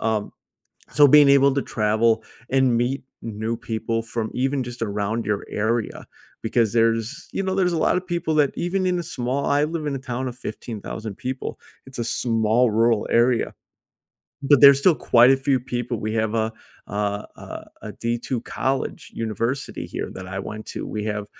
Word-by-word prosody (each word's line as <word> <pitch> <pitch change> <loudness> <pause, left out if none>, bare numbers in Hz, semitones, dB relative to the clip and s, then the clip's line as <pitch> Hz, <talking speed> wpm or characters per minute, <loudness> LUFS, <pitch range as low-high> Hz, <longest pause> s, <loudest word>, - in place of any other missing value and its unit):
Um. 110 -2 -1 0.6
So 145 -1 +6
being 145 +1 +7
able 140 0 +6
to 140 - 0
travel 110 +1 +1 0.3
and 130 -2 +3
meet 125 +4 0 0.2
new 110 +1 -3
people 115 0 -2
from 115 -1 -4
even 135 +1 0
just 120 0 -7
around 105 +1 -1
your 105 -1 -1
area 110 +1 -2 0.4
because 115 -1 +1
there's, 115 +3 0
you - - -1
know, 190 -1 -1
there's 185 -2 +2
a 165 - 0
lotta 180 - +2
people 170 -3 -2
that 145 -3 +3
even 185 +2 -1
in 180 -1 +1
a - - -2
small 135 -2 -2
I 145 +1 +3
live 155 0 -3
in 145 - -1
a 135 - -3
town 130 0 -4
of 125 - -8
15,000 110 -2 -6
people. 130 +1 -5 0.3
It's 130 -2 -11
a - - -1
small 115 +1 +2
rural 115 -1 +2
area, 120 0 +2 0.9
but 140 0 +5
there's 140 -1 +9
still 165 +1 +4
quite 120 +1 +5
a 135 - +5
few 135 -1 +1
people. 120 -2 -3
We 110 +1 -2
have 110 0 0
a 110 0 0 0.4
a - - -8 0.4
a - - -9 0.2
a 105 - -6
D2 120 +3 -2
college 135 0 -3
university 115 +4 -3
here - - -5
that 95 -1 -8
I 95 +1 -4
went 110 +2 -7
to. - - -5
We 105 -1 -4
have, 105 -1 -3
120 Hz, 180 wpm, -23 LUFS, 110-135 Hz, 0.9 s, there's